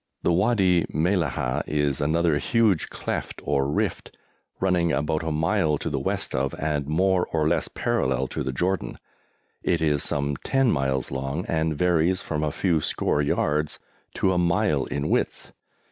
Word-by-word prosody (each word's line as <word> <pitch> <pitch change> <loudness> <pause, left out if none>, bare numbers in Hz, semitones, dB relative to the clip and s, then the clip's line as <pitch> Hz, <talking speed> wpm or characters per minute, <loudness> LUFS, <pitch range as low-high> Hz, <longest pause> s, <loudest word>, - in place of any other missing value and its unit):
The - - +3
Wadi 95 -3 +3
Mellahah 80 -7 0
is 75 -2 0
another 80 +1 +2
huge 110 - +2
cleft - - -4
or 70 0 +1
rift, 75 - -2 0.4
running 90 -3 +2
about 75 +1 0
a 80 0 -2
mile 80 0 +1
to - - -4
the - - -1
west - - -2
of, 65 +1 -1
and 75 -2 -1
more 90 +4 +2
or 80 -2 0
less 85 - +1
parallel 65 0 0
to, - - -4
the 65 - -2
Jordan. 90 +8 -1 0.7
It 85 -2 +1
is 75 -3 +1
some 70 -1 -1
10 135 - +1
miles 65 -2 -1
long, 70 +5 -3
and 80 -2 -1
varies 90 +1 +2
from 75 -1 -2
a 75 - 0
few 85 0 +1
score 75 - 0
yards 75 +1 0 0.4
to 95 - +2
a 90 - +1
mile 85 -4 +2
in 70 +1 -3
width. - - -1
80 Hz, 160 wpm, -25 LUFS, 75-90 Hz, 0.7 s, The